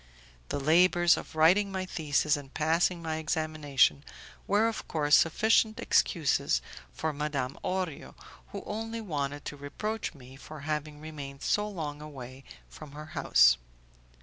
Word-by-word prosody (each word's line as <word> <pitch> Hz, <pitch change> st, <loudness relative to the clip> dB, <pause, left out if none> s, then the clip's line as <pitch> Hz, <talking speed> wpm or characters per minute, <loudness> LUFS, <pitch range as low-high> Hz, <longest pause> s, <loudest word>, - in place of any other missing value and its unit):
The -, -, -2 dB
labours 175 Hz, +4 st, +5 dB
of -, -, -8 dB
writing 185 Hz, +6 st, +4 dB
my 190 Hz, -1 st, -3 dB
thesis 150 Hz, -3 st, +1 dB
and 140 Hz, -2 st, -9 dB
passing 165 Hz, +3 st, +1 dB
my 160 Hz, -1 st, -2 dB
examination 155 Hz, -4 st, +1 dB, 0.4 s
were 210 Hz, +3 st, +3 dB
of 225 Hz, -, -4 dB
course 150 Hz, -2 st, +3 dB
sufficient 220 Hz, +6 st, +3 dB
excuses -, -, +2 dB, 0.3 s
for 160 Hz, -1 st, -3 dB
Madame 140 Hz, -3 st, -2 dB
Orio, 185 Hz, -5 st, -3 dB, 0.3 s
who -, -, -7 dB
only 225 Hz, +2 st, -4 dB
wanted 145 Hz, -8 st, -4 dB
to -, -, -5 dB
reproach 200 Hz, +9 st, -4 dB
me 130 Hz, -1 st, -13 dB
for 150 Hz, +1 st, -10 dB
having 150 Hz, 0 st, -4 dB
remained 145 Hz, -3 st, -8 dB
so 210 Hz, 0 st, +1 dB
long 150 Hz, -6 st, -5 dB
away 135 Hz, -3 st, -10 dB, 0.2 s
from 60 Hz, -, -12 dB
her 150 Hz, +1 st, -8 dB
house. -, -, +5 dB
155 Hz, 140 wpm, -29 LUFS, 145-175 Hz, 0.4 s, labours